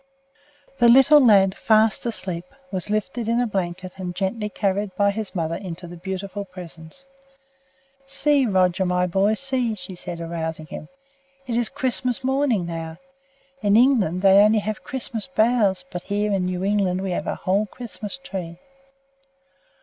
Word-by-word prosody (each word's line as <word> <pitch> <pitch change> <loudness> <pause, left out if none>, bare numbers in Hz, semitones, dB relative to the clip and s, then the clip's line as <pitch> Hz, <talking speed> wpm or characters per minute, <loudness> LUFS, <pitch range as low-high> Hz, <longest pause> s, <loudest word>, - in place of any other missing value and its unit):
The 240 -1 +6
little 270 +4 +7
lad, 195 -5 +5
fast 220 +1 +2
asleep, 180 -6 -4 0.3
was 185 0 -2
lifted 220 +2 -2
in 230 +1 +1
a 245 - +2
blanket 185 -3 -3
and 180 -2 -5
gently 210 +3 -2
carried 200 -1 -2
by 200 0 +3
his 210 -1 -6
mother 165 -2 -1
into 175 -1 -6
the 175 0 -9
beautiful 190 +3 -5
presence. 180 +4 -12 1.0
"See! 280 -1 +2
Roger, 185 -2 +2
my 180 0 +1
boy, 195 +4 +1
see!" 255 -3 +3
she 185 -1 -8
said, 175 -1 -7
arousing 165 -1 -4
him. 155 - -9 0.6
"It 240 -3 -3
is 240 -1 +1
Christmas 260 -2 -1
morning 265 -7 +1
now! 165 -1 -6 0.6
In 205 -1 +3
England 220 - +3
they 195 0 +7
only 210 +2 +5
have 215 +1 -3
Christmas 245 -3 -4
boughs, 215 -7 +1
but 180 - -5
here 205 +2 -1
in 190 -2 0
New 180 0 -3
England 195 -2 +1
we 190 -1 -3
have - - -3
a - - -1
whole 200 +3 0
Christmas 225 +1 -7
tree." 185 -10 -7
200 Hz, 155 wpm, -23 LUFS, 180-230 Hz, 1.0 s, little